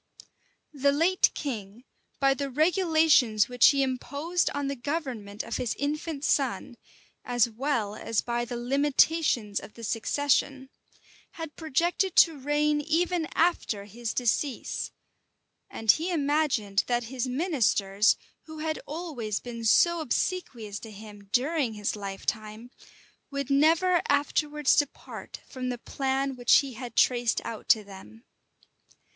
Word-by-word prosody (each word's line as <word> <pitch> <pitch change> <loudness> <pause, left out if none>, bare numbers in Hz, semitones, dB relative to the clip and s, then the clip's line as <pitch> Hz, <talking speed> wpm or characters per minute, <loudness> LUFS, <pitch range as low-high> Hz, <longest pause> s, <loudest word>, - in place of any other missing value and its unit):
} - - -40 0.3
THE 280 0 +2
late 335 +6 +3
king, 225 -5 -5 0.4
by 275 -1 +4
the 275 +1 -4
regulations 315 - +3
which 245 -1 +5
he 275 -1 +4
imposed 285 +7 -1
on 285 -1 -3
the 280 - -2
government 245 -7 -4
of 230 - -4
his 245 -3 -2
infant 300 0 -3
son, - - 0 0.5
as 245 -2 +2
well 235 -3 -2
as 220 0 -2
by 240 0 -2
the 240 0 -5
limitations 270 -3 +2
of 210 - -13
the 230 - -11
succession, 265 +4 0 0.6
had 325 -2 -7
projected 345 +4 0
to 320 -4 +5
reign 295 +2 +1
even 330 +2 0
after 320 - +1
his 225 +2 -5
decease; 250 +2 -1 0.8
and 225 -2 +3
he 330 +4 -2
imagined 285 - +1
that 240 0 0
his 255 -1 -2
ministers, 235 - +2 0.3
who 315 -1 -10
had 310 0 -3
always 285 - -4
been 235 -2 -8
so 340 +10 +4
obsequious 240 - -2
to 225 - -10
him 205 -1 -12
during 270 -1 +1
his 210 0 -2
lifetime, 215 +3 -5 0.6
would 280 -1 -4
never 330 +5 +4
afterwards 295 0 +2
depart 290 -2 -3
from 255 -2 -5
the 245 - -3
plan 270 +2 -2
which 245 -1 +4
he 275 -2 -7
had 240 0 -8
traced 240 -2 +3
out 225 -2 -7
to 220 -3 +5
them. 200 +3 -13
265 Hz, 135 wpm, -27 LUFS, 230-300 Hz, 0.8 s, which